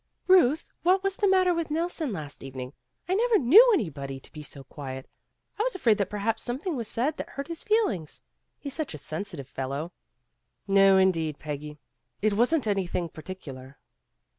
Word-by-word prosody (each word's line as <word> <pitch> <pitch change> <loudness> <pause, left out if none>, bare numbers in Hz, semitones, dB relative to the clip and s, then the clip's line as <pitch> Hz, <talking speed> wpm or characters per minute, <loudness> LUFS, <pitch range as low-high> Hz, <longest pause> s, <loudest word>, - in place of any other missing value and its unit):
"Ruth, 335 -5 +4
what 375 +3 +3
was 390 0 0
the 405 - +1
matter 370 -2 +4
with 335 -2 -2
Nelson 320 -2 -1
last 150 -7 -6
evening? 130 -1 -7 0.3
I 365 - 0
never 455 +2 +3
knew 400 - +8
anybody 140 - -2
to - - -12
be 155 - -9
so 140 -2 -8
quiet. 130 -1 -8 0.5
I - - +2
was - - 0
afraid 230 - +3
that 195 -2 0
perhaps 215 +2 -1
something 285 +8 -2
was 235 -4 -3
said 270 +8 -1
that - - -6
hurt 275 +2 -6
his 335 -1 -5
feelings. 425 - 0 0.3
He's 280 -2 -7
such 310 - -4
a - - -6
sensitive 155 -1 -5
fellow." 140 +5 -4 0.8
"No 195 -1 +6
indeed, 165 -6 +2
Peggy. 150 0 -6 0.4
It 215 0 +1
wasn't 245 +7 +2
anything 185 -4 -1
par 160 - -11
ticular." 140 -7 -9
205 Hz, 175 wpm, -27 LUFS, -, 0.8 s, knew